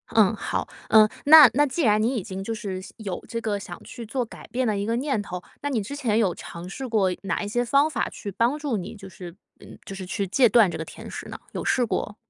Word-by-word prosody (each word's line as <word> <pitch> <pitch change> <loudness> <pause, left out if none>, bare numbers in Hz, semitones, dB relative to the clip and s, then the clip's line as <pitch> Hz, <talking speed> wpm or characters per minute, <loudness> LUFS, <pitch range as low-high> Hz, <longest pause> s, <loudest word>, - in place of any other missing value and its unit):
嗯， 220 -1 +5
好。 - - -3 0.2
嗯， 215 -1 +6 0.2
那 300 -2 +10
那 290 +3 +4
既 290 +5 -2
然 215 -4 +3
你 245 +4 +1
已 215 - -2
经 190 -1 -6
就 225 +4 -3
是 195 -4 -5
有 200 -6 -5
这 230 - -4
个 210 -2 -1
想 175 -2 -9
去 235 -2 -9
做 250 +3 -2
改 230 - -12
变 255 +1 -1
的 215 -2 0
一 200 - -2
个 230 +2 0
念 260 -3 -1
头， 180 -2 -7 0.2
那 285 - -2
你 240 -6 0
之 280 +8 -6
前 230 -7 0
有 200 -6 +2
尝 170 +2 -9
试 260 +6 -6
过 205 -5 +2
哪 200 +1 -2
一 - - -4
些 240 +3 0
方 280 +5 +3
法 - - -1
去 200 - -7
帮 235 +8 +1
助 290 -7 -2
你， 185 - -6
就 195 -2 -11
是， 175 -1 -10 0.2
嗯 - - -13
就 195 - -8
是 190 -1 -6
去 195 +2 -2
戒 240 +7 +4
断 215 -4 +5
这 - - -5
个 160 - -5
甜 - - -10
食 - - -7
呢？ - - -7
有 - - -5
试 250 - +2
过 210 -2 -3
220 Hz, 285 characters per minute, -25 LUFS, 195-250 Hz, 0.2 s, 那